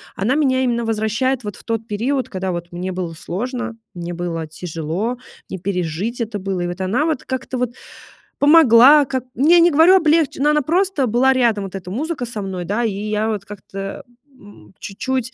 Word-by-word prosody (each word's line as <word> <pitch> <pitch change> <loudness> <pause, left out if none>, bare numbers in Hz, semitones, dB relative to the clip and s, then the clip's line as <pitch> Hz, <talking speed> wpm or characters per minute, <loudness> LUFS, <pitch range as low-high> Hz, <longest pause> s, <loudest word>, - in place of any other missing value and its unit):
Она 210 +7 0
меня 260 -3 +2
именно 235 -2 0
возвращает 225 +4 -1
вот 205 -2 -5
в - - -15
тот 225 -1 -3
период, 250 +6 -1
когда 190 -1 -3
вот 175 0 -5
мне 180 +2 -4
было 180 -2 -4
сложно, 240 +8 -5 0.2
мне 175 0 -6
было 165 -2 -4
тяжело, 165 +8 -4 0.3
не 190 - -5
пережить 180 +5 -3
это 220 -2 -3
было. 190 -1 -3
И 175 - -1
вот 175 +2 -5
она 215 +11 +1
вот 315 -5 -1
как-то 260 0 -4
вот 245 -1 -2 0.6
помогла 285 -1 +7
как 260 -1 -3
Я 330 +6 +5
не 340 +1 +6
говорю 325 +5 +6
облегче 320 -5 +2
но 295 - +4
она 300 0 +2
просто 350 -1 +1
была 250 +4 +3
рядом, 230 -6 +1
вот 195 - -8
эта 180 -1 -7
музыка 285 - -3
со 230 -3 -6
мной, 190 -2 -5
да. 210 +6 -1
И 220 -3 0
я 210 +2 -2
вот 205 -3 -3
как-то, 195 -1 -10
э, 195 0 -6 0.3
м, 205 - -17
чуть-чуть 255 +4 -3
225 Hz, 195 wpm, -20 LUFS, 190-260 Hz, 0.6 s, помогла